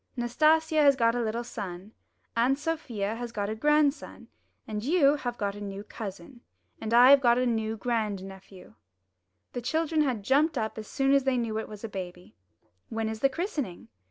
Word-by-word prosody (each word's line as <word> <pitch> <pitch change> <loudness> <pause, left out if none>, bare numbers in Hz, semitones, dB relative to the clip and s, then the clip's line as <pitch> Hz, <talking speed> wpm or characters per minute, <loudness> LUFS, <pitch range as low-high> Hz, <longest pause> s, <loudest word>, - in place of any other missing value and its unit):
Nastasia 310 +6 +3
has 280 -2 +6
got 230 -2 +2
a 245 - -1
little 230 +1 -2
son, 200 -4 -7 0.4
Aunt 245 +4 +2
Sofia 255 -10 -3
has 240 -1 -5
got 205 -2 -3
a - - -3
grandson, 295 +3 +1 0.4
you 275 +7 +2
have 245 -3 -4
got 200 -2 -2
a 205 - -9
new 200 0 -6
cousin, 210 +2 -9 0.4
and 220 - -5
I 245 +3 +8
have 280 -1 +7
got 240 -2 +4
a 255 - +1
new 225 -2 -1
grand 215 -3 -2
nephew." 190 -1 -12 0.8
The 245 - -4
children 315 +4 0
had 250 -8 -1
jumped 285 +6 +2
up 220 -1 -3
as 215 - -8
soon 270 0 +1
as 275 -1 +4
they 265 -1 +1
knew 225 -2 -1
it - - -6
was 210 0 -10
a - - -3
baby. 180 -3 -8 0.6
''When 225 0 -2
is 220 - -6
the 275 - +3
christening?'' 295 - -4
235 Hz, 185 wpm, -28 LUFS, 210-275 Hz, 0.8 s, I